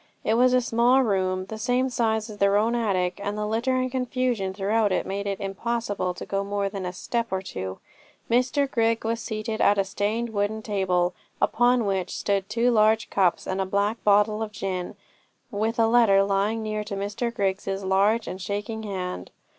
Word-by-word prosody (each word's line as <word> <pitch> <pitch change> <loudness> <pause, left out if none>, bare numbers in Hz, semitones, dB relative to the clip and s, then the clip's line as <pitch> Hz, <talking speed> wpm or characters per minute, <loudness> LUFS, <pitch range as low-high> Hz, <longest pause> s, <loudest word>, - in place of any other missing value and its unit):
It 220 - +1
was 250 +2 +4
a 255 - +4
small 240 +3 +3
room, 185 -4 0
the 220 +2 -7
same 250 +3 +1
size 220 -3 0
as 215 -2 -9
their 200 0 +4
own 225 +3 +2
attic, 190 -6 0
and 205 +1 -3
the 210 - -1
litter 230 +5 0
and 255 0 0
confusion 250 -6 -1
throughout 205 +3 +1 0.2
made 200 +1 -3
it 195 -1 -2
impossible 200 -2 -2
to - - -7
go 195 0 -1
in 200 - -6
more 200 -1 -1
than 195 -2 -5
a - - -3
step 235 +5 -2
or 190 0 -2
two. 95 - -5 0.5
Mr 255 +4 +2
Grigg 230 -3 0
was 230 +1 -1
seated 220 -1 -4
at 205 - +4
a 195 - +3
stained 210 +4 -2
wooden 210 +1 -1
table, 185 -4 0 0.3
upon 245 -1 +3
which 190 -2 -2
stood 195 -1 -1
two 235 +3 +2
large 220 0 +3
cups 185 -3 +2
and 190 +1 -2
a - - 0
black 200 +3 0
bottle 210 +1 +3
of 220 -1 -3
gin, 190 -2 -4 0.6
with 220 +3 -1
a 225 - +4
letter 225 -4 +5
lying 200 +3 0
near 215 -1 -2
to 210 -1 -5
Mr 205 +4 -2
Grigg's 195 -4 -2
large 195 +3 +1
and 185 +1 -6
shaking 205 +3 -4
hand. 185 - -5
210 Hz, 195 wpm, -25 LUFS, 195-230 Hz, 0.6 s, letter